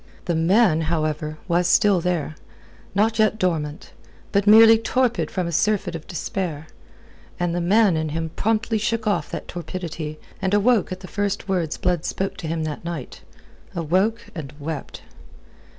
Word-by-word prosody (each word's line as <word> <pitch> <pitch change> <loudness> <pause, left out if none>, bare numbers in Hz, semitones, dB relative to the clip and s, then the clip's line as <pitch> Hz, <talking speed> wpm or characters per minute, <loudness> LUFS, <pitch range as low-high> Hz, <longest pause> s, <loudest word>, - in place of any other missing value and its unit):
The 175 - 0
man, 165 +1 +3
however, 155 -1 -1
was 175 0 +2
still 200 -1 +4
there, 170 -3 -1 0.6
not 220 +2 +2
yet 215 0 +3
dormant, 160 -6 -2 0.4
but 200 +1 +1
merely 225 +1 +8
torpid 245 +1 0
from 185 -2 -2
a 170 - -3
surfeit 195 +1 +1
of 165 -2 -7
despair; 170 -3 -4 0.7
and 175 -1 0
the 175 - -1
man 200 +1 +4
in 160 0 -1
him 160 +1 -3
promptly 225 +1 0
shook 230 +1 -1
off 210 - 0
that - - -6
torpidity 165 -3 -5 0.2
and 190 +1 +1
awoke 210 -1 +3
at 185 0 -5
the 185 - -9
first 205 0 -2
words 175 -5 -1
Blood 180 -3 0
spoke 195 0 -2
to 175 -5 -6
him 160 0 -2
that 155 +1 -4
night 170 -6 -6 0.5
awoke 185 +8 0
and 150 -4 -7
wept. 150 0 -6
180 Hz, 160 wpm, -23 LUFS, 160-210 Hz, 0.7 s, merely